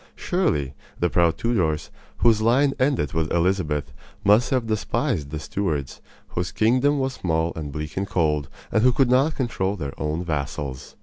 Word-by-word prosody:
Surely, 115 - 0 0.3
the 90 - +1
proud 85 -2 +3
Tudors, 90 -11 0 0.3
whose 110 -2 +5
line 135 +5 +3
ended 130 - +1
with 80 -2 -1
Elizabeth, 85 -7 0 0.3
must 105 +4 +4
have 130 -3 +1
despised 105 -9 -1
the 75 - -4
"Stewards," 75 -1 -3 0.3
whose 90 +1 -3
kingdom 125 +7 +3
was 135 -1 -1
small 80 -6 -1
and 75 -3 -5
bleak 75 +1 -5
and 100 +1 -1
cold, 75 -6 0 0.2
and 110 - +3
who 125 +2 +5
could 130 -1 +3
not 135 +5 +3
control 105 -6 -1
their 70 -7 -5
own 80 +3 -1
vassals. 70 -4 -4
90 Hz, 165 wpm, -24 LUFS, 75-120 Hz, 0.3 s, whose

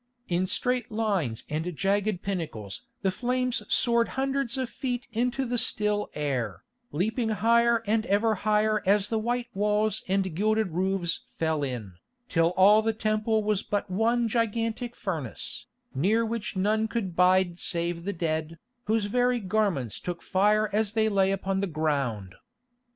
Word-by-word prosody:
In 180 +1 0
straight 250 +3 0
lines 195 - -1
and 160 +3 -3
jagged 200 -1 0
pinnacles 155 - -4 0.2
the 190 - +2
flames 250 +2 0
soared 235 -2 +3
hundreds 270 -1 0
of 260 -1 -1
feet 250 -1 -4
into 250 +4 0
the 245 0 +2
still 210 -3 +2
air, 130 -10 -2 0.3
leaping 220 - -1
higher 230 +1 +3
and 220 +1 +1
ever 215 +3 +2
higher 215 +1 +1
as 200 0 +3
the 225 - 0
white 240 +2 -2
walls 210 +1 +1
and 190 -3 0
gilded 215 0 +1
roofs 180 0 0
fell 160 -2 0
in, 120 -9 -4 0.4
till 165 -2 +3
all 205 +3 +7
the 225 0 0
Temple 215 0 0
was 210 -1 +1
but 205 -2 -3
one 230 +4 +2
gigantic 230 +1 -1
furnace, 160 - -4 0.3
near 210 +12 +2
which 225 -2 -4
none 215 +3 +1
could 205 -7 -3
bide 180 -1 +3
save 170 0 -2
the 200 - -2
dead, 160 -2 -2 0.3
whose 220 0 +1
very 245 +3 +1
garments 190 - -1
took 175 -1 -5
fire 210 +3 +2
as 215 0 +1
they 220 -1 +2
lay 195 -2 +2
upon 195 0 -1
the 200 - 0
ground. 140 - -2
210 Hz, 150 wpm, -27 LUFS, 175-225 Hz, 0.4 s, all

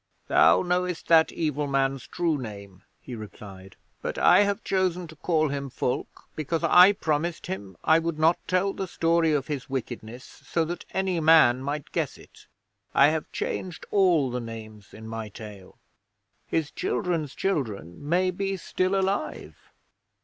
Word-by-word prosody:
'Thou - - +5
knowest 180 -1 -1
that 160 -1 +6
evil 150 -3 -2
man's 135 -1 0
true 170 -3 0
name,' 100 -7 -8 0.2
he 130 - -9
replied, 100 -3 -10 0.3
'but - - -4
I - - +6
have 200 +1 +1
chosen 185 -2 0
to 160 - -12
call 155 -1 +1
him 140 0 -4
Fulke 125 0 -3
because 155 +2 -2
I 180 +4 +7
promised 160 -2 -2
him 95 -2 -6
I 160 +1 +5
would 165 -1 -3
not 160 +2 +3
tell 185 +2 +1
the 190 - -4
story 165 -1 +2
of 145 -3 0
his 145 -4 -5
wickedness 120 -2 -5
so 165 -1 -3
that 175 +2 -6
any 190 -2 -1
man 155 -6 +5
might 145 +1 -4
guess - - -2
it. - - -18 0.5
I 140 +1 +7
have 160 0 -3
changed 180 -3 -4
all 175 -10 +3
the 125 0 -3
names 110 -3 -10
in 110 0 -11
my 110 -1 -5
tale. 105 -3 -11 0.7
His 155 -2 -1
children's 175 - -2
children 105 - -2
may 185 +2 +2
be 195 +1 -2
still 185 +2 0
alive.' 195 +1 -3
155 Hz, 155 wpm, -26 LUFS, 125-175 Hz, 0.7 s, I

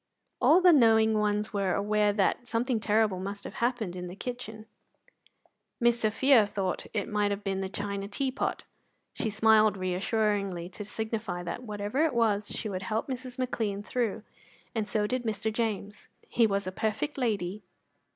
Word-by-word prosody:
All 345 +4 +6
the 360 -1 +7
knowing 220 -5 +5
ones 210 +1 0
were 195 -3 +1
aware 210 +1 +2
that 205 +4 0
something 235 0 0
terrible 210 -3 +2
must 200 +2 -5
have - - -7
happened 235 -7 0
in 180 0 -5
the 180 - -8
kitchen. 220 -2 -6 1.1
Miss 240 -1 +3
Sophia 225 +1 +4
thought 195 -3 -3
it 205 -3 -2
might 205 -1 0
be 195 - -1
the 190 0 -3
china 200 0 -4
tea 260 +6 -2
pot. 255 - -2 0.5
She 220 - -2
smiled 215 -1 +4
reassuringly 190 -1 -1
to 200 +3 -7
signify 215 -4 -3
that, 170 +6 -4
whatever 210 +4 -1
it 310 -6 +1
was, 210 -3 +2
she 220 - -4
would 185 -3 -3
help 215 +4 -2
Mrs. 255 -1 -5
McLean 220 -6 -2
through, 225 -2 -2 0.5
and 220 -3 -1
so 210 0 0
did 255 +4 -1
Mr. 220 -1 -2
James. 210 -3 -3 0.2
He 230 -2 +3
was 200 -2 -1
a 185 - -3
perfect 220 +9 -2
lady. 210 -5 -1
215 Hz, 165 wpm, -29 LUFS, 200-230 Hz, 1.1 s, the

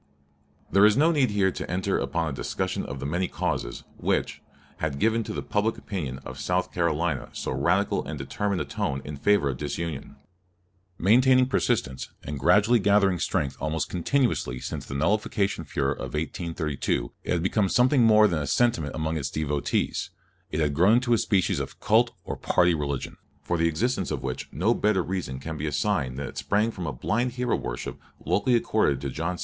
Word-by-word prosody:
There 100 +3 +5
is 105 +2 +6
no 160 +4 +5
need 145 -6 +2
here 100 -2 +2
to - - -6
enter 95 +3 0
upon 85 -1 -1
a - - -2
discussion 65 - -2
of 70 0 -6
the 70 - -5
many 90 +6 0
causes - - -3
which, - - -1 0.4
had 75 -3 -2
given 115 +6 +2
to - - -5
the - - -4
public 105 +2 0
opinion 75 -11 -4
of 65 +1 -8
South 90 +4 -1
Carolina 85 -3 0
so - - -4
radical 85 +10 +1
and - - -6
determined 100 -3 -2
a - - -2
tone 70 0 -3
in 75 - -5
favor 100 +2 +2
of 65 -2 -2
disunion. 75 0 -4 0.8
Maintaining 130 +7 +5
persistence, 115 - -1
and 70 0 -5
gradually 105 - +4
gathering 100 -3 +3
strength 70 -3 -1
almost 80 +3 -1
continuously 95 - 0
since - - -6
the 70 - -5
nullification 100 +5 0
furor 70 -1 -1
of 70 - -6
1832, 75 -6 -2
it - - -1
had 85 -2 0
become 95 +1 +1
something 125 +4 +4
more 110 -2 +6
than 85 -5 -1
a 75 - -3
sentiment 100 - +1
among 80 +1 -1
its 70 -3 -2
devotees: 75 -2 -1 0.4
it 75 - -2
had 75 -2 +1
grown 90 +8 +5
into 120 0 +3
a - - +5
species 95 -4 +1
of - - -6
cult - - +3
or - - -4
party 90 0 +2
religion, 70 -3 -3 0.3
for 90 - -1
the 85 0 +2
existence 115 +11 0
of - - -3
which - - -4
no 95 - +2
better 105 -5 +1
reason 90 -9 -3
can 80 +3 -6
be 75 +2 -3
assigned 70 -3 0
than 70 - -3
that - - -5
it - - -12
sprang 105 +3 +1
from 90 -5 -5
a - - -1
blind 115 - -1
hero 125 -1 0
worship - - -5 0.3
locally 100 +8 +2
accorded 110 - +2
to 70 0 -4
John 85 +5 -3
C. - - -14
90 Hz, 195 wpm, -26 LUFS, 75-105 Hz, 0.8 s, is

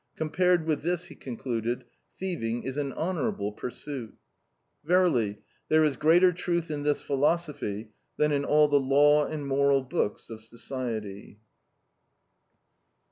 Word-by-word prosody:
Compared 175 +2 +1
with 155 -2 0
this," 175 +2 -1
he - - -10
concluded, 120 -2 -3 0.3
"thieving 120 -12 -3
is 130 +1 -4
an 145 -2 -2
honorable 155 - -2
pursuit." 125 +2 -7 0.7
Verily, 150 - +2 0.3
there 155 0 +5
is 150 -3 +2
greater 170 +6 +5
truth 170 -1 -2
in 145 -1 -3
this 145 0 +1
philosophy 140 -8 -1 0.3
than 150 0 +2
in 140 -1 +1
all 150 +1 +4
the 145 -1 +3
law 145 +2 +4
and 150 -2 -5
moral 140 0 +2
books 130 -6 -2
of 110 -1 -8
society. 110 -4 -6
145 Hz, 130 wpm, -28 LUFS, 120-155 Hz, 0.7 s, there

